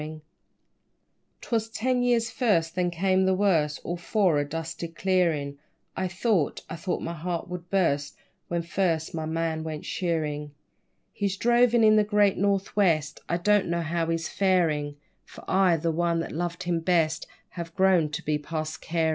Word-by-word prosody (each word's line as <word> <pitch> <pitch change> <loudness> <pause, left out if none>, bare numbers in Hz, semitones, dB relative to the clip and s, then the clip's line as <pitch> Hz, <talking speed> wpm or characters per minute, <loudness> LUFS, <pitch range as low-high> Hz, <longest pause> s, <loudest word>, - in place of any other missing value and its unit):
_ 155 +1 -7 1.2
'Twas 225 -2 -1
ten 250 +3 0
years 235 -2 +2
first, 170 -10 +1
then 180 -1 0
came 185 +2 +1
the 190 - +3
worst, 165 -7 +2
All 175 - -3
for 175 -3 +2
a - - +1
dusty 165 +1 -4
clearin', 165 -5 0 0.4
I 185 - -1
thought, 185 -3 0
I - - -6
thought 170 +3 -3
my 165 - -3
heart 170 +1 -4
would 180 -1 -7
burst 145 -7 +1 0.3
When 170 -1 -2
first 170 -2 -1
my 160 -1 -3
man 160 0 -2
went 155 -1 -6
shearin'; 150 -5 -2 0.6
He's 200 -2 -2
drovin' 240 0 +4
in 215 0 +6
the 210 - +5
great 205 -1 +3
North 200 0 0
west, 165 -7 +2
I 170 - +1
don't 205 +2 +2
know 170 0 0
how 165 0 -1
he's 165 0 -1
farin'; 165 -7 +1 0.3
For - - -14
I, 185 -3 +3
the 165 +1 -1
one 170 +1 0
that - - -5
loved 170 +2 -3
him 175 -1 0
best, 165 -2 +1 0.2
Have 170 -1 -8
grown 185 -5 +3
to 150 - -5
be 150 0 0
past 155 +1 -5
carin'. 165 -1 0
170 Hz, 170 wpm, -26 LUFS, 160-190 Hz, 1.2 s, in